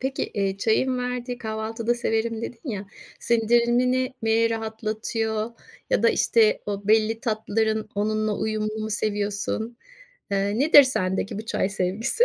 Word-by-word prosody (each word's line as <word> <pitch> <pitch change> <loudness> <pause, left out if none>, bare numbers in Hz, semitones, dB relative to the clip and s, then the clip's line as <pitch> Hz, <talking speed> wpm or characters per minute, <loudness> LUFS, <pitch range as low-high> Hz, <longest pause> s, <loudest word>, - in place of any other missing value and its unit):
Peki, 265 +1 -2
eee, 195 -1 0
çayın 250 +5 +1
verdiği 250 0 -3
"Kahvaltıda 225 +1 -2
severim." 230 -1 -1
dedin 245 +4 -6
ya. 205 -2 -5 0.3
Sindirimini 240 +3 +2
mi 225 +1 +3
rahatlatıyor 220 0 -2 0.4
ya - - +2
da, 230 - +6
işte, 220 -2 +3
o 200 0 -4
belli 220 +1 +3
tatların 220 -2 -1
onunla 215 +1 0
uyumunu 215 0 -2
mu 220 - -4
seviyorsun? 210 +2 -2 0.5
Eee, 200 +2 0
nedir 290 +1 +8
sendeki 195 -6 -1
bu 220 - -7
çay 190 - 0
sevgisi? 210 - +1
220 Hz, 130 wpm, -24 LUFS, 215-235 Hz, 0.5 s, nedir